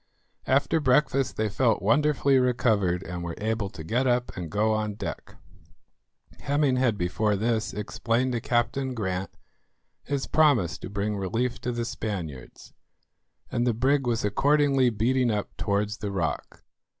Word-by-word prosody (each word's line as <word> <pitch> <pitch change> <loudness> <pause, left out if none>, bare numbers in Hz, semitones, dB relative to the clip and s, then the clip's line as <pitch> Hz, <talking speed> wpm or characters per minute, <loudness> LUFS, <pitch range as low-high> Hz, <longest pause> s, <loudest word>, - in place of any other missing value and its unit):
After 140 +4 +2
breakfast 135 -1 +2
they 110 - +1
felt 115 +2 +1
wonderfully 140 +4 +3
recovered, 110 -8 +1
and 90 -1 -6
were 85 -1 -4
able 110 -1 -2
to 85 -4 -9
get 120 +10 0
up 125 0 0
and 90 -3 -5
go 110 +4 +1
on 105 -1 -2
deck. - - -6 1.0
Hemming 140 +3 +1
had 125 -5 +2
before 100 +4 0
this 110 +2 0
explained 115 +4 -1
to 120 -2 -2
Captain 125 +3 0
Grant 95 -3 -2 0.7
his 140 -1 -3
promise 120 - +2
to - - -7
bring 100 +2 -2
relief 115 +6 -2
to 125 - -2
the 120 -1 -2
Spaniards, 85 - -6 0.8
and 120 +1 0
the 120 - +1
brig 135 +2 +1
was 115 -2 0
accordingly 140 +3 +3
beating 120 +3 +1
up 105 -2 -2
towards 105 0 -1
the 105 -2 -4
rock. 85 -5 -3
115 Hz, 150 wpm, -26 LUFS, 100-130 Hz, 1.0 s, wonderfully